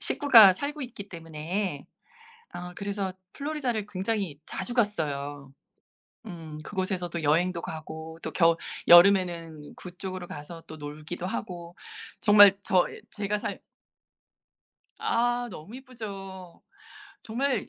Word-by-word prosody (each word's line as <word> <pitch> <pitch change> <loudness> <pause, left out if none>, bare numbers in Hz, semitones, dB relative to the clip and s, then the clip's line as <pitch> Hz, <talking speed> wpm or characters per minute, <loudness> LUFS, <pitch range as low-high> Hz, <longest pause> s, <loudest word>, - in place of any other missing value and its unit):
식구가 230 - +7
살고 290 +8 -4
있기 220 -6 -8
때문에 165 0 -4 0.7
어 180 0 -6
그래서 200 -2 -3 0.2
플로리다를 275 -8 -2
굉장히 195 -5 -2
자주 245 - -5
갔어요. 145 - -1 0.7
음. 165 -6 -8
그곳에서 185 -1 -2
또 170 -1 -4
여행도 170 +4 +2
가고 160 +1 -7
또 - - -4
겨 165 -2 +4 0.3
여름에는 175 -4 +5
그쪽으로 185 0 -7
가서 165 +2 -9
또 155 - -9
놀기도 150 +4 -6
하고 175 -3 -6 0.4
정말 205 -2 +8
저 185 -4 +3
이 - - -10
제가 210 0 -2
살 - - -5 1.4
아 240 +1 +1
너무 200 +6 -9
예쁘죠. 195 -8 -9 0.6
정말 245 0 -1
185 Hz, 240 characters per minute, -27 LUFS, 165-210 Hz, 1.4 s, 정말